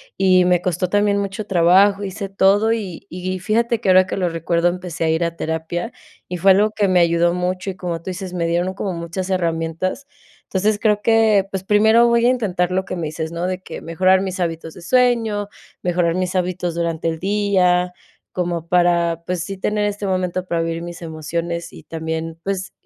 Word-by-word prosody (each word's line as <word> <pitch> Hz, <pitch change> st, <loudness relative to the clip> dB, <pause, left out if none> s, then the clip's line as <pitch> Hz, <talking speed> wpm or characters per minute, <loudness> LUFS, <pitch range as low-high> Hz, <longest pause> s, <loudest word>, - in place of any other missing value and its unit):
y 185 Hz, -1 st, +4 dB
me 180 Hz, -1 st, +3 dB
costó 180 Hz, 0 st, -1 dB
también 205 Hz, +1 st, +2 dB
mucho 200 Hz, +1 st, -3 dB
trabajo, 195 Hz, +2 st, +4 dB
hice 195 Hz, +1 st, -5 dB
todo 200 Hz, +3 st, +3 dB
y 200 Hz, -7 st, -4 dB
y 185 Hz, +1 st, -4 dB
fíjate 230 Hz, +4 st, 0 dB
que 195 Hz, -, 0 dB
ahora 185 Hz, 0 st, +6 dB
que -, -, -3 dB
lo 180 Hz, -3 st, 0 dB
recuerdo 170 Hz, +1 st, +1 dB
empecé 180 Hz, -2 st, -5 dB
a 160 Hz, -, +2 dB
ir 160 Hz, +2 st, +1 dB
a 170 Hz, 0 st, -3 dB
terapia 160 Hz, +7 st, -3 dB, 0.4 s
y 180 Hz, -, -3 dB
fue 195 Hz, +3 st, +5 dB
algo 210 Hz, +3 st, +4 dB
que 205 Hz, -2 st, +1 dB
me 185 Hz, -1 st, +4 dB
ayudó 170 Hz, 0 st, +3 dB
mucho 185 Hz, +2 st, -2 dB
y -, -, -11 dB
como 175 Hz, -2 st, -3 dB
tú -, -, -28 dB
dices, 185 Hz, 0 st, -6 dB
me 170 Hz, -2 st, -1 dB
dieron 175 Hz, +2 st, 0 dB
un -, -, -5 dB
como 195 Hz, -1 st, -3 dB
muchas 170 Hz, +3 st, -5 dB
herramientas. 170 Hz, -, -2 dB, 0.4 s
Entonces, 205 Hz, +2 st, 0 dB
creo 210 Hz, -2 st, +2 dB
que 220 Hz, -3 st, +4 dB
pues 190 Hz, -1 st, -3 dB
primero 220 Hz, +3 st, +5 dB
voy 235 Hz, 0 st, +3 dB
a -, -, +5 dB
intentar 185 Hz, -8 st, 0 dB
lo 190 Hz, +1 st, 0 dB
que 185 Hz, -, -5 dB
me 165 Hz, -3 st, -3 dB
dices, 160 Hz, +1 st, -5 dB
¿no?, 170 Hz, +2 st, -2 dB
de 185 Hz, 0 st, -2 dB
que -, -, -8 dB
mejorar 185 Hz, +3 st, +2 dB
mis 190 Hz, -1 st, -4 dB
hábitos 165 Hz, -2 st, -3 dB
de 180 Hz, -, -11 dB
sueño, 225 Hz, -2 st, +2 dB, 0.3 s
mejorar 175 Hz, -1 st, +1 dB
mis 185 Hz, +1 st, -2 dB
hábitos 180 Hz, -1 st, -1 dB
durante 165 Hz, -1 st, -2 dB
el 160 Hz, -, -3 dB
día, 185 Hz, -3 st, +2 dB, 0.4 s
como 170 Hz, -2 st, -2 dB
para 170 Hz, -1 st, +2 dB
pues, 180 Hz, -1 st, -2 dB
sí 195 Hz, 0 st, -6 dB
tener 210 Hz, +1 st, 0 dB
este 205 Hz, 0 st, -3 dB
momento 185 Hz, -1 st, -1 dB
para 170 Hz, -2 st, -1 dB
vivir 165 Hz, 0 st, -3 dB
mis 175 Hz, 0 st, -8 dB
emociones 170 Hz, +1 st, -4 dB
y -, -, -11 dB
también 160 Hz, 0 st, -5 dB
pues 195 Hz, -1 st, -3 dB
180 Hz, 205 wpm, -20 LUFS, 170-195 Hz, 0.4 s, ahora